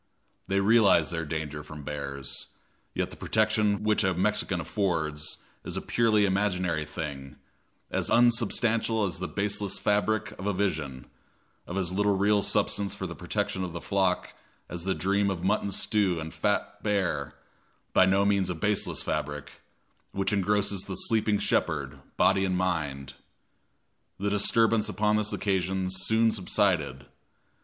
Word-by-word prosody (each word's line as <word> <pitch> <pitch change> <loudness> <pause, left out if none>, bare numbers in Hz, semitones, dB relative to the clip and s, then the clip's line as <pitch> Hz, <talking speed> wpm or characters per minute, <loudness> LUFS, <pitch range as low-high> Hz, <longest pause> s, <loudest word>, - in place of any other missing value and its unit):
They 100 0 +1
realize 100 -7 +4
their 80 -1 -3
danger 75 -1 -4
from 75 0 -10
bears, 70 -2 -5 0.5
yet - - -1
the - - -9
protection 110 -1 +1
which 110 0 +2
a 95 -2 +1
Mexican 95 0 +1
affords 80 -5 -2 0.3
is - - -4
a - - +1
purely 110 -3 +2
imaginary 90 -5 0
thing, 70 -3 -6 0.6
as - - -1
unsubstantial 115 -2 +3
as 90 -2 -3
the 90 - -3
baseless 100 -1 -1
fabric 105 +1 +1
of 95 - -4
a 105 - +1
vision, 75 -10 -2 0.6
of 90 - -4
as 90 -2 -1
little 100 +1 +1
real 100 +1 +3
substance 100 -1 0
for 95 - -5
the 85 - -5
protection 95 +2 -2
of 90 -2 -5
the 85 - -4
flock 95 -1 0 0.4
as 85 0 -5
the 95 - 0
dream 100 +1 +1
of 90 -3 -3
mutton 100 +1 +1
stew 100 -5 +1
and 80 0 -6
fat 105 0 -1
bear, 95 -9 -1 0.6
by 95 - +6
no 100 +1 +3
means 100 -2 +2
a 90 - -2
baseless 105 +5 0
fabric, 75 0 -4 0.5
which 95 +1 0
engrosses 100 0 +1
the 95 -1 -6
sleeping 110 -1 +2
shepherd, 70 -7 -1 0.2
body 95 0 +4
and 95 -1 0
mind. 75 -7 -2 1.1
The 100 +1 -1
disturbance 110 +1 +3
upon 105 0 +1
this 105 -1 0
occasion 95 -1 -1
soon 110 +4 +2
subsided. 85 - 0
95 Hz, 150 wpm, -28 LUFS, 85-105 Hz, 1.1 s, by